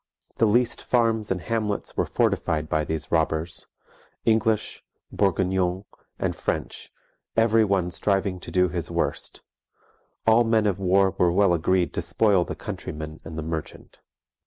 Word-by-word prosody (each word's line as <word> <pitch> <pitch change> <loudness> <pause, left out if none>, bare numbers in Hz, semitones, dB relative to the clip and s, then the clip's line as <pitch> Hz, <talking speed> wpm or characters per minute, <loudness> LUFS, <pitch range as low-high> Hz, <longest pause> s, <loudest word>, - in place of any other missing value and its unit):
The 115 - +4
least 120 +3 +2
farmes 115 -3 +1
and 95 - 0
hamlets 110 -2 -2
were - - 0
fortified 80 -1 0
by 75 0 0
these 80 0 -4
robbers, 80 0 0 0.6
English, 110 -1 +1 0.3
Bourguegnons, 95 -1 +1 0.3
and - - -1
French, - - -4 0.5
every 115 0 +4
one 95 -4 +1
striving 95 0 0
to - - -9
do 90 0 +3
his 85 - -3
worst; - - -2 0.8
all 115 +1 +5
men 115 -2 +2
of 100 -2 0
war 95 0 +3
were 90 -1 +4
well 95 0 +4
agreed 90 +2 +1
to - - -1
spoile 100 -5 +3
the - - -6
countryman 80 +1 -6
and 80 - -8
merchant. 80 -2 -6
95 Hz, 140 wpm, -25 LUFS, 85-110 Hz, 0.8 s, all